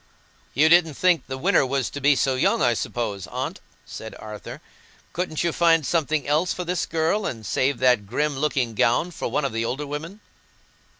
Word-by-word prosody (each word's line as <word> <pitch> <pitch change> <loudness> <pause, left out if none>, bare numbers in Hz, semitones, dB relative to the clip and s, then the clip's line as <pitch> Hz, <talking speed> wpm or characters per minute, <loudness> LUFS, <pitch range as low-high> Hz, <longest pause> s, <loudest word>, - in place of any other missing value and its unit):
"You 150 +3 +5
didn't 165 -2 +4
think 180 -3 +2
the 130 - -5
winner 180 +6 +3
was 135 0 -1
to 145 - -6
be 145 +1 +5
so 130 +1 +1
young, 130 - +2
I 120 -1 +3
suppose, 105 -4 -3
Aunt?" - - -4 0.3
said 110 - -8
Arthur. 105 -1 -9 0.5
"Couldn't 170 -3 -2
you 170 - +1
find 165 -3 +3
something 155 -3 0
else 155 +5 +1
for 180 - -4
this 180 +1 -1
girl, 165 +6 0
and 110 -3 -6
save 130 +8 0
that 125 -6 +2
grim 145 +6 -1
looking 135 -6 0
gown 120 +11 +2
for - - -4
one 150 - -1
of 135 - -2
the 115 0 -1
older 135 +5 -3
women?" 160 +8 -7
145 Hz, 190 wpm, -24 LUFS, 125-165 Hz, 0.5 s, You